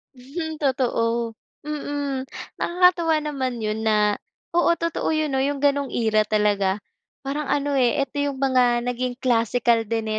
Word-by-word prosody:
Hmm 315 +6 -5
totoo. 235 -4 0 0.3
Mm, 285 -3 -3 0.3
nakakatuwa 350 -2 +3
naman 265 -5 -3
yun 215 0 -2
na, 210 -1 +3 0.4
oo 345 0 +4
totoo 335 0 -2
yun 310 -2 0
'no 265 - +2
yung 285 0 -1
ganong 285 -1 +1
era 220 -2 +2
talaga. 210 -2 +1 0.5
Parang 285 +1 -3
ano 285 0 0
eh, 260 +2 +2
eto 275 -1 -2
yung 280 -2 -3
mga 255 -3 +3
naging 245 0 -2
classical 235 -1 +2
din 225 0 -2
260 Hz, 140 wpm, -23 LUFS, 230-290 Hz, 0.5 s, oo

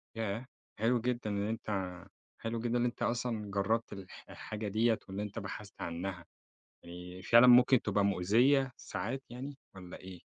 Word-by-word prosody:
ياه! 110 +2 -2 0.3
حلو 115 +2 +2
جدًا، 120 -2 -1
إن 100 0 -1
أنت 95 -5 -3 0.4
حلو 115 +1 -3
جدًا 120 +1 0
إن 120 - +2
أنت 120 - -3
أصلًا 115 -4 -1
جرّبت 110 +4 0
الح 95 -2 -10
الحاجة 105 0 -6
دِيّة 110 +2 +2
وإن 95 +1 -4
أنت 105 +1 -4
بحثت 100 0 -8
عنّها 85 +1 -4 0.6
آآ، 90 +1 -9
فعلًا 120 +2 +9
ممكن 125 0 +7
تبقى 100 -1 +1
مؤذيّة، 120 +9 +3
ساعات 115 +8 -4
يعني 135 +4 -7 0.2
والّا 90 -2 -9
إيه؟ 95 -1 -10
105 Hz, 155 wpm, -33 LUFS, 95-120 Hz, 0.6 s, فعلًا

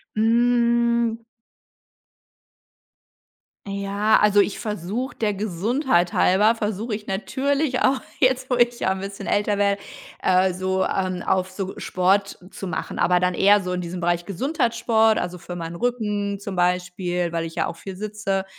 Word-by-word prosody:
Hm. 235 0 +2 2.4
Ja, 200 +2 +1
also 210 -1 +4
ich 200 - -1
versuche, 215 +5 -4
der 210 -2 -1
Gesundheit 205 - 0
halber, 210 +5 +4
versuche 215 0 -2
ich 210 0 -8
natürlich 265 +7 -1
auch 265 0 +2 0.2
jetzt, 255 0 +2
wo 250 - +2
ich 240 0 +2
ja 190 - +1
'n 190 - -2
bisschen 195 0 -7
älter 205 0 +1
werde, 200 0 +2 0.4
äh, 185 0 +3
so, 190 +1 -1
ähm, 185 -2 -1
auf 185 +1 0
so 190 0 -5
Sport 195 +2 0
zu 195 - -8
machen. 160 - -4
Aber 180 0 +3
dann 180 0 0
eher 205 +3 +5
so 180 -1 -4
in 180 - -2
diesem 175 +1 -5
Bereich 175 0 0
Gesundheitssport, 225 - +1
also 180 0 -4
für 175 +1 -8
meinen 170 -1 -6
Rücken 210 -2 -2
zum 200 -1 -6
Beispiel, 180 -1 0
weil 165 -1 -2
ich 165 - -7
ja - - -1
auch - - -6
viel 190 +2 -8
sitze. 200 -1 -3
200 Hz, 155 wpm, -23 LUFS, 180-230 Hz, 2.4 s, eher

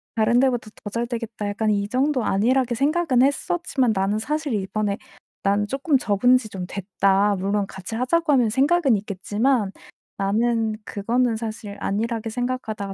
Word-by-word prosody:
다른 230 +2 +3
데보다 245 -4 0
더 205 - -4
잘되겠다.' 230 -1 -4
약간 215 +1 -1
이 205 -1 +1
정도 260 +2 +1
안일하게 245 +4 +2
생각은 280 0 +2
했었지만 280 -2 +1
나는 195 +2 +1
사실 300 +2 -2
이번에 200 +1 -1 0.5
"난 200 +1 +2
쪼끔 275 +4 +1
접은 245 +2 +3
지 220 -4 -7
좀 185 -2 -5
됐다. 195 +1 +1
물론 200 +2 0
같이 190 +4 -7
하자고 295 +7 +1
하면 245 -5 +4
생각은 275 +2 +3
있겠지만 205 +3 0 0.5
나는 220 +2 +1
그거는 230 +3 0
사실 215 -2 -6
안일하게 225 +2 -2
생각하다가 220 -5 -3
225 Hz, 345 characters per minute, -23 LUFS, 205-255 Hz, 0.5 s, 하면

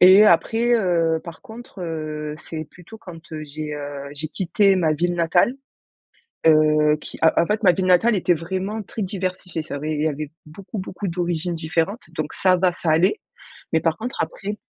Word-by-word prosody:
Et 190 +4 +9
après, 225 +6 +3
heu, 170 -6 +2
par 170 -2 -10
contre, 220 -3 -11
heu, 155 -2 -4
c'est 160 -2 -6
plutôt 180 +8 -14
quand, 165 -4 -12
heu, 155 -1 -5
j'ai, 150 0 -6
heu, 145 -1 -6
j'ai 155 +2 -4
quitté 195 +3 +2
ma 160 -4 +2
ville 175 +3 0
natale, 175 +9 +2 0.9
heu, 155 -1 +5
qui, - - -6
en 160 - +7
en - - 0
fait 210 +1 -1
ma 185 - +6
ville 185 +2 -1
natale 185 +6 +4
était 180 -1 +2
vraiment 190 +6 -3
très 210 +2 -6
diversifiée. 185 -3 -3
Ça 155 - -7
avait 155 +2 -3
il 150 - -1
y - - +2
avait 150 0 -4 0.2
beaucoup, 195 +7 -8
beaucoup 190 +1 -5
d'origines 175 0 -1
différentes, 165 +7 -2
donc - - -3
ça 185 -1 +3
va, 180 0 +2
ça 170 -1 -2
allait. 170 - +3 0.5
Mais 160 - +3
par 165 +2 0
contre 245 +3 -5
après 205 +1 -5
170 Hz, 190 wpm, -22 LUFS, 155-190 Hz, 0.9 s, Et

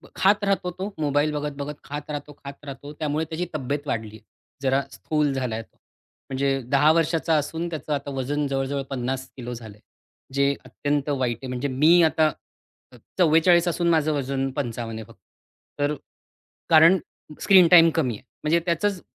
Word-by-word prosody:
खात 205 +2 +3
राहतो 195 -2 0
तो, 190 +3 -6
मोबाईल 145 0 +1
बघत-बघत 145 0 -4
खात 145 +1 -7
राहतो, 145 0 -6
खात 140 +1 -9
राहतो. 140 +1 -8
त्यामुळे 150 +1 -2
त्याची 165 +2 -3
तब्येत 145 +1 -3
वाढलीय. 110 -3 -4 0.4
जरा 135 0 +2
स्थूल 150 0 -1
झालाय 125 -4 -2
तो. - - -21 0.5
म्हणजे 135 0 0
10 145 +3 +5
वर्षाचा 165 0 +1
असून 160 +3 -2
त्याचं 155 -2 -4
आता 140 0 -3
वजन 140 +2 -2
जवळ-जवळ 135 0 -2
50 130 0 -3
किलो 125 -1 -6
झालंय, 110 -3 -10 0.5
जे 140 +1 +2
अत्यंत 145 0 -2
वाईट 130 -5 0
आहे. 135 - -6
म्हणजे 125 +2 -3
मी 155 +6 +5
आता 155 -1 +3 0.6
अ, - - -16 0.2
44 170 0 +4
असून 170 0 +1
माझं 155 -2 +2
वजन 135 -1 -1
55 115 -4 -4
आहे 110 - -8
फक्त. - - -20 0.6
तर 145 +1 +1 0.7
कारण 165 +3 +7 0.4
स्क्रीन 185 -3 +7
टाईम 165 -1 +8
कमी 135 -7 +1
आहे. 105 - -14 0.2
म्हणजे 160 +3 +3
त्याचंच 180 +2 0
145 Hz, 160 wpm, -24 LUFS, 135-160 Hz, 0.7 s, टाईम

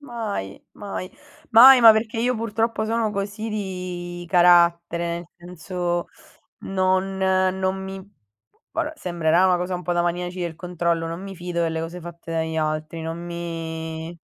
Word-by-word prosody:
Mai, 220 - -5
mai. 195 -2 -6 0.4
Mai 255 +3 +9
ma 225 - +11
perché 220 +1 -2
io 250 +2 +1
purtroppo 225 0 -1
sono 225 -1 0
così 210 +2 -4
di 180 -3 -5
carattere, 170 -1 +3
senso 175 0 -4 0.6
non 190 0 0
non 190 0 +1
mi 190 0 -6 0.7
vabbè, - - -2
sembrerà 170 0 +2
una 180 -1 +4
cosa 180 +1 -3
un 180 - -4
po' 175 - -1
da 175 - +2
maniaci 175 +1 -2
del 170 -2 -3
controllo, 170 -1 -1
non 165 +2 -5
mi 195 0 -7
fido 175 -1 -3
delle 165 -1 -1
cose 170 +2 -6
fatte 170 -1 -10
dagli 160 0 -2
altri, 155 +1 -2
non 165 +1 -5
mi 165 -1 -5
180 Hz, 145 wpm, -23 LUFS, 170-195 Hz, 0.7 s, ma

